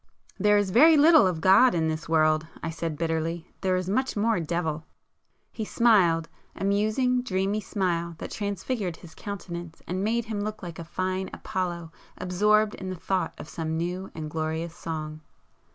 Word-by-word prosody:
"There 210 0 +4
is 205 -2 +1
very 310 - +7
little 310 - +7
of 170 -3 -2
God 195 +6 +6
in 160 -1 +1
this 155 0 -3
world"—I 155 0 +1
said 165 -1 -4
bitterly; 165 +1 -2
"There 185 -1 +1
is 185 0 -2
much 260 +5 0
more 220 -1 +2
Devil!" 160 -1 -2 0.7
He 220 - -4
smiled,—a 190 -9 +1
musing, 215 +6 +2
dreamy 200 -2 -1
smile 170 -4 -2
that - - -7
transfigured 200 -2 -3
his 170 -3 -14
countenance 175 -5 -7
and 185 +2 -2
made 230 +2 0
him 215 -2 -3
look 215 -1 -5
like 170 -2 -7
a - - -5
fine 185 +3 -2
Apollo 175 -3 -4 0.3
absorbed 210 +4 +2
in 190 - -6
the 185 - -4
thought 185 0 -2
of - - -9
some 160 0 -3
new 180 +3 -3
and 155 -1 -5
glorious 160 +1 -3
song. 155 -1 -5
185 Hz, 165 wpm, -26 LUFS, 165-210 Hz, 0.7 s, very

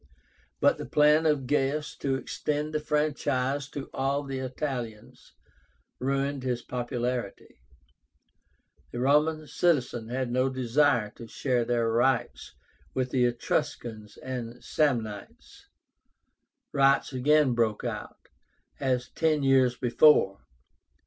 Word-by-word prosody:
But - - +3
the - - -5
plan 150 +2 +4
of 145 -4 +1
Gaius 145 +2 0
to 135 -1 -1
extend 150 +3 -3
the 155 - +1
franchise 145 -2 -1
to 140 -2 -6
all 135 +2 0
the 135 -1 -5
Italians 125 -4 -6 0.7
ruined 140 +1 -1
his 125 -2 -2
popularity. 120 - -4 1.3
The 120 - -5
Roman 150 +4 +2
citizens 135 -7 0
had 125 0 -2
no 130 +2 +2
desire 130 -3 +1
to 115 - -9
share 125 -1 -1
their 120 -1 +1
rights 120 +1 0 0.4
with 130 -1 -1
the 125 -2 +3
Etruscans 115 -2 -3
and 125 -2 -6
Samnites. 115 -9 -2 1.1
Riots 135 0 +3
again 140 +1 +3
broke 115 -3 0
out, - - -6 0.5
as 130 -2 0
ten 155 -3 +1
years 130 -2 +3
before. 120 -6 +4
130 Hz, 110 wpm, -27 LUFS, 120-145 Hz, 1.3 s, plan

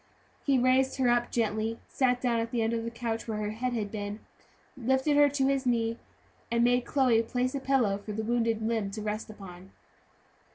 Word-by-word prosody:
He 275 -2 +3
raised 260 +1 +3
her 255 -2 +2
up 240 0 +2
gently, 220 0 -1
sat 250 -2 +1
down 240 -2 +1
on 230 - -1
the 235 -2 0
end 225 +1 0
of 230 -1 -1
the 230 - -3
couch 230 -1 -4
where 220 -2 -2
her 210 0 -2
head 245 +3 -2
had 210 -4 -2
been, 205 0 -5 0.6
lifted 265 +3 +1
her 290 0 +6
to 275 -1 0
his 270 -1 +1
knee, 230 -1 0 0.5
and 235 0 +2
made 245 0 +3
Chloe 250 -4 +3
place 250 +2 -1
a 280 - -2
pillow 250 -7 +1
for 210 +1 -7
the 220 +1 -3
wounded 230 -1 0
limb 220 -3 0
to 210 +2 -6
rest 215 +1 -3
upon. 190 -3 -11
235 Hz, 205 wpm, -29 LUFS, 220-255 Hz, 0.6 s, her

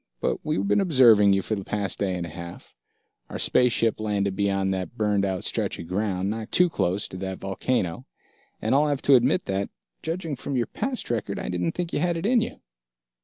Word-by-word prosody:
But - - -1
we've 95 +2 -1
been 105 - +3
observing 120 - +6
you 95 -1 +1
for 110 - -2
the 100 -2 -3
past 100 0 -2
day 95 -2 0
and 85 - -3
a - - -7
half 85 +2 -10 0.6
our - - -5
space 125 -1 +3
ship 115 -2 +1
landed 100 -2 -1
beyond 95 -1 +1
that 95 -3 -5
burned 105 -2 +1
out 95 -2 -1
stretch - - -1
of 85 - -7
ground, 95 0 -1
not 110 +2 -4
too 180 -1 +4
close 95 - 0
to 95 - -7
that 95 0 -4
volcano 95 -2 -2 0.5
and - - 0
I'll 145 +2 +4
have 145 -2 -1
to 140 - +5
admit 130 +9 +3
that, 95 0 -2 0.3
judging 165 -2 -3
from 135 +2 -5
your 120 - +1
past 255 - -3
record, 105 -4 -2
I - - -4
didn't 90 -1 -1
think 175 -1 -4
you - - +1
had 170 +1 +1
it 165 - -4
in 240 +1 +4
you." 230 - -5
105 Hz, 220 wpm, -25 LUFS, 95-135 Hz, 0.6 s, observing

